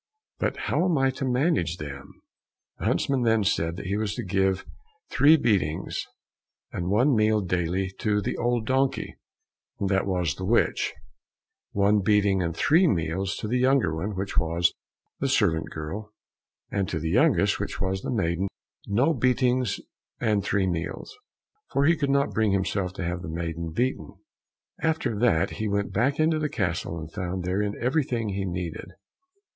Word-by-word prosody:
But -, -, -1 dB
how -, -, 0 dB
am 175 Hz, -4 st, +2 dB
I 135 Hz, 0 st, +3 dB
to 130 Hz, +1 st, -4 dB
manage 125 Hz, -, +1 dB
them?" 70 Hz, -3 st, -8 dB, 0.7 s
The -, -, -4 dB
huntsman 135 Hz, -2 st, +1 dB
then 115 Hz, -2 st, +3 dB
said 85 Hz, -4 st, 0 dB
that 95 Hz, -, -7 dB
he 100 Hz, +2 st, -1 dB
was 105 Hz, -1 st, -2 dB
to -, -, -4 dB
give 95 Hz, 0 st, 0 dB, 0.5 s
three 155 Hz, +3 st, +6 dB
beatings 95 Hz, -, 0 dB, 0.6 s
and 90 Hz, 0 st, -3 dB
one 125 Hz, +7 st, +3 dB
meal 110 Hz, 0 st, +3 dB
daily 90 Hz, +1 st, -1 dB
to 105 Hz, -1 st, +1 dB
the 100 Hz, -, -2 dB
old 120 Hz, -2 st, 0 dB
donkey, 130 Hz, +2 st, 0 dB, 0.6 s
and 100 Hz, -, 0 dB
that 95 Hz, 0 st, +1 dB
was 90 Hz, -6 st, 0 dB
the 95 Hz, -, -8 dB
witch; 115 Hz, +5 st, +2 dB, 0.8 s
one 100 Hz, +1 st, +3 dB
beating 100 Hz, -1 st, +3 dB
and 85 Hz, -1 st, -2 dB
three 170 Hz, +5 st, +4 dB
meals 95 Hz, -, 0 dB
to 110 Hz, -, -3 dB
the 125 Hz, +3 st, +1 dB
younger 130 Hz, -, +3 dB
one, 95 Hz, +6 st, -3 dB
which 100 Hz, +1 st, -1 dB
was 85 Hz, +1 st, +1 dB, 0.5 s
the 135 Hz, -, 0 dB
servant 90 Hz, -11 st, +2 dB
girl; 95 Hz, +8 st, -6 dB, 0.6 s
and 100 Hz, -2 st, -1 dB
to 80 Hz, -, -2 dB
the 80 Hz, +1 st, -2 dB
youngest, 115 Hz, -, +3 dB
which 100 Hz, -1 st, -4 dB
was 95 Hz, 0 st, -1 dB
the -, -, -5 dB
maiden, 95 Hz, -5 st, 0 dB, 0.4 s
no 125 Hz, +11 st, +3 dB
beatings 125 Hz, -3 st, +1 dB, 0.4 s
and 105 Hz, -3 st, +1 dB
three 100 Hz, -2 st, +1 dB
meals, 85 Hz, -, -4 dB, 0.6 s
for 140 Hz, -, +2 dB
he 165 Hz, +3 st, +5 dB
could 145 Hz, -3 st, -1 dB
not 140 Hz, +1 st, +2 dB
bring 110 Hz, -2 st, +2 dB
himself 95 Hz, -1 st, 0 dB
to 95 Hz, -, -5 dB
have 90 Hz, +1 st, -2 dB
the 95 Hz, -, -6 dB
maiden 85 Hz, 0 st, -4 dB
beaten. 125 Hz, +10 st, -2 dB, 0.7 s
After 160 Hz, -7 st, 0 dB
that 110 Hz, -9 st, +3 dB
he 110 Hz, -, 0 dB
went 100 Hz, 0 st, -1 dB
back 130 Hz, +8 st, +1 dB
into 155 Hz, 0 st, +3 dB
the 150 Hz, -1 st, -1 dB
castle, 85 Hz, -6 st, -2 dB
and 80 Hz, -1 st, -7 dB
found 90 Hz, -1 st, -3 dB
therein 100 Hz, +3 st, -1 dB
everything 125 Hz, -4 st, 0 dB
he 100 Hz, 0 st, -2 dB
needed. 90 Hz, +1 st, -5 dB
100 Hz, 170 wpm, -26 LUFS, 90-125 Hz, 0.8 s, three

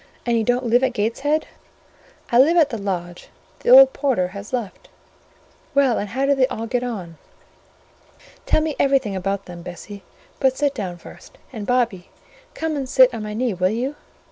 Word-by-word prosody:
"And 235 Hz, -1 st, +1 dB
you 225 Hz, -, +1 dB
don't 245 Hz, +3 st, 0 dB
live 240 Hz, +2 st, +3 dB
at 260 Hz, -1 st, +1 dB
Gateshead?" 270 Hz, +8 st, -1 dB, 0.9 s
"I 240 Hz, -, +4 dB
live 320 Hz, +7 st, +5 dB
at 305 Hz, -4 st, +4 dB
the 230 Hz, -, -3 dB
lodge: 175 Hz, -3 st, -5 dB, 0.3 s
the -, -, -3 dB
old -, -, +9 dB
porter 240 Hz, -11 st, 0 dB
has 200 Hz, +1 st, -9 dB
left." 240 Hz, -6 st, -5 dB, 0.9 s
"Well, 270 Hz, -5 st, +3 dB
and 205 Hz, -, -4 dB
how 265 Hz, +6 st, -1 dB
do 280 Hz, -, +3 dB
they 265 Hz, -2 st, +2 dB
all 225 Hz, -3 st, -5 dB
get 245 Hz, +1 st, -1 dB
on? 185 Hz, -9 st, -6 dB, 1.3 s
Tell -, -, +3 dB
me 310 Hz, -2 st, -2 dB
everything 270 Hz, -7 st, +1 dB
about 195 Hz, +1 st, -3 dB
them, 175 Hz, -1 st, -10 dB
Bessie: 185 Hz, +4 st, -9 dB, 0.4 s
but 265 Hz, -1 st, +2 dB
sit 285 Hz, -1 st, +1 dB
down 185 Hz, -8 st, -5 dB
first; -, -, -15 dB, 0.2 s
and, 215 Hz, -4 st, -6 dB
Bobby, 235 Hz, -8 st, 0 dB, 0.5 s
come 320 Hz, -1 st, -2 dB
and 270 Hz, -3 st, -4 dB
sit 255 Hz, 0 st, +5 dB
on 230 Hz, -, -5 dB
my 210 Hz, 0 st, -5 dB
knee, 240 Hz, -1 st, -1 dB
will 185 Hz, 0 st, +1 dB
you?" 250 Hz, +7 st, -3 dB
240 Hz, 185 wpm, -21 LUFS, 200-270 Hz, 1.3 s, old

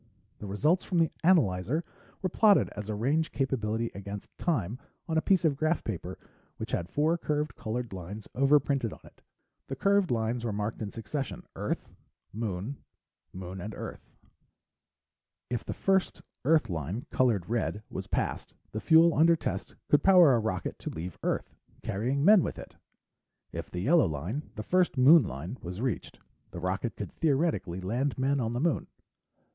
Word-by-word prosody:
The 105 Hz, -, -7 dB
results 150 Hz, -, +2 dB
from 180 Hz, -, -2 dB
the 165 Hz, -2 st, +3 dB
analyzer 140 Hz, -, +3 dB, 0.4 s
were 185 Hz, -, +1 dB
plotted 205 Hz, +3 st, +4 dB
as 105 Hz, 0 st, -7 dB
range 135 Hz, +10 st, 0 dB
capability 115 Hz, -4 st, -1 dB
against 100 Hz, +1 st, -8 dB
time 125 Hz, -, -1 dB, 0.3 s
on 160 Hz, -, -1 dB
a 160 Hz, -, +3 dB
piece 185 Hz, -2 st, +3 dB
of 150 Hz, -3 st, +3 dB
graph 155 Hz, +4 st, 0 dB
paper 90 Hz, -3 st, -5 dB, 0.4 s
which -, -, -6 dB
had 85 Hz, 0 st, -2 dB
four 160 Hz, -, +1 dB
curved 150 Hz, -4 st, -1 dB
colored 115 Hz, 0 st, -4 dB
lines 95 Hz, +4 st, -7 dB
overprinted 135 Hz, -3 st, +2 dB
on -, -, -12 dB
it. -, -, -18 dB, 0.5 s
The 135 Hz, -, -4 dB
curved 200 Hz, -1 st, +3 dB
lines 115 Hz, 0 st, 0 dB
were 115 Hz, -, -1 dB
marked 105 Hz, +2 st, -3 dB
in 105 Hz, -, -3 dB
succession: 130 Hz, +6 st, -5 dB
"Earth," -, -, -3 dB, 0.5 s
"Moon," 110 Hz, +4 st, -3 dB, 0.5 s
"Moon" 95 Hz, 0 st, -7 dB
and 105 Hz, +4 st, -6 dB
"Earth." -, -, -8 dB, 1.4 s
If 120 Hz, -, -1 dB
the -, -, -5 dB
first 190 Hz, -1 st, +1 dB, 0.2 s
Earth 155 Hz, -4 st, +4 dB
line, 90 Hz, -, -4 dB
colored 115 Hz, -9 st, +2 dB
red, 110 Hz, -2 st, -1 dB
was -, -, -5 dB
passed, -, -, -2 dB, 0.2 s
the 110 Hz, -, -4 dB
fuel 165 Hz, +3 st, +6 dB
under 165 Hz, +3 st, +5 dB
test -, -, -4 dB
could 145 Hz, -, +4 dB
power 180 Hz, -7 st, +7 dB
a 120 Hz, -, +3 dB
rocket 100 Hz, -6 st, -3 dB
to -, -, -5 dB
leave 85 Hz, +3 st, -6 dB
Earth, -, -, -2 dB, 0.3 s
carrying 130 Hz, +8 st, -1 dB
men 205 Hz, -1 st, +8 dB
with -, -, -3 dB
it. -, -, -10 dB, 0.8 s
If -, -, -6 dB
the 90 Hz, -, -4 dB
yellow 155 Hz, -, +4 dB
line 85 Hz, -, -4 dB
the 105 Hz, -, -5 dB
first 180 Hz, +1 st, +2 dB
Moon 150 Hz, +6 st, +8 dB
line 80 Hz, -, -6 dB
was 90 Hz, +2 st, -6 dB
reached, 125 Hz, -4 st, -3 dB, 0.3 s
the 85 Hz, -, -7 dB
rocket 95 Hz, +6 st, -2 dB
could 100 Hz, -4 st, -6 dB
theoretically 140 Hz, -, 0 dB
land 120 Hz, +9 st, -1 dB
men 135 Hz, +2 st, +1 dB
on 115 Hz, -2 st, -1 dB
the 120 Hz, -, -1 dB
Moon. 160 Hz, +1 st, 0 dB
120 Hz, 165 wpm, -29 LUFS, 100-155 Hz, 1.4 s, men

